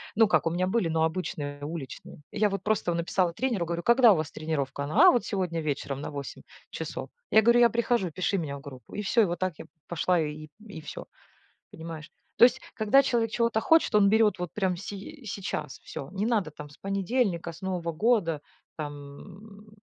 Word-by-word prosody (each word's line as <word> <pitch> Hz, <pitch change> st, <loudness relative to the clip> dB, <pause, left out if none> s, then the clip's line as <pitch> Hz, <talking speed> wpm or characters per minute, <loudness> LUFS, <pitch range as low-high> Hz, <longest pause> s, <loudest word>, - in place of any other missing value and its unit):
Ну 225 Hz, +1 st, +5 dB
как 190 Hz, -, +3 dB
у -, -, +3 dB
меня 175 Hz, +2 st, 0 dB
были, 190 Hz, -1 st, +1 dB
но 160 Hz, 0 st, +1 dB
обычные 160 Hz, -4 st, -3 dB
уличные. 150 Hz, -2 st, -8 dB
Я 210 Hz, 0 st, +2 dB
вот 195 Hz, -1 st, -4 dB
просто 210 Hz, -5 st, 0 dB
в -, -, -2 dB
написала 170 Hz, +1 st, 0 dB
тренеру 230 Hz, -5 st, -1 dB
говорю: 170 Hz, +1 st, -3 dB
"Когда 235 Hz, -2 st, +6 dB
у -, -, +1 dB
вас 155 Hz, -2 st, -3 dB
тренировка?" 145 Hz, -3 st, -3 dB
А 330 Hz, -, +7 dB
вот 245 Hz, -, 0 dB
сегодня 180 Hz, -5 st, -2 dB
вечером 140 Hz, -2 st, -3 dB
на 150 Hz, -, -5 dB
8 140 Hz, -1 st, -7 dB, 0.3 s
часов. -, -, -5 dB, 0.2 s
Я 220 Hz, -, +6 dB
говорю: 235 Hz, +2 st, +5 dB
"Я 235 Hz, -1 st, +7 dB
прихожу, 235 Hz, -5 st, +1 dB
пиши 185 Hz, +4 st, -1 dB
меня 145 Hz, -5 st, -3 dB
в -, -, -12 dB
группу". 135 Hz, -4 st, -12 dB
И 210 Hz, -, -2 dB
всё, 215 Hz, +1 st, +3 dB
вот 175 Hz, 0 st, -3 dB
так 185 Hz, -4 st, -1 dB
я -, -, -8 dB, 0.2 s
пошла 175 Hz, +2 st, +1 dB
и 155 Hz, 0 st, -5 dB, 0.2 s
и 200 Hz, -7 st, -9 dB
всё, 155 Hz, -2 st, -8 dB, 0.6 s
понимаешь. 160 Hz, -1 st, -8 dB, 0.3 s
То -, -, +8 dB
есть, 250 Hz, -, +1 dB
когда 220 Hz, +5 st, +5 dB
человек 235 Hz, -4 st, 0 dB
чего-то 230 Hz, -2 st, +1 dB
хочет, 325 Hz, -9 st, +4 dB
он 200 Hz, -1 st, +6 dB
берёт 220 Hz, -2 st, +4 dB
вот 175 Hz, -2 st, -5 dB
прямо 190 Hz, -3 st, 0 dB
сей 205 Hz, -, -8 dB
сейчас 190 Hz, -8 st, -4 dB
и -, -, -35 dB
всё. 135 Hz, -, -7 dB
Не 200 Hz, +2 st, -1 dB
надо 210 Hz, -9 st, 0 dB
там 150 Hz, 0 st, -10 dB
с 145 Hz, -, -17 dB
понедельника, 195 Hz, -3 st, -1 dB
с 165 Hz, -, -14 dB
нового 180 Hz, -3 st, -2 dB
года, 170 Hz, -6 st, +1 dB, 0.3 s
там, 175 Hz, +9 st, -9 dB
185 Hz, 205 wpm, -27 LUFS, 155-215 Hz, 0.6 s, То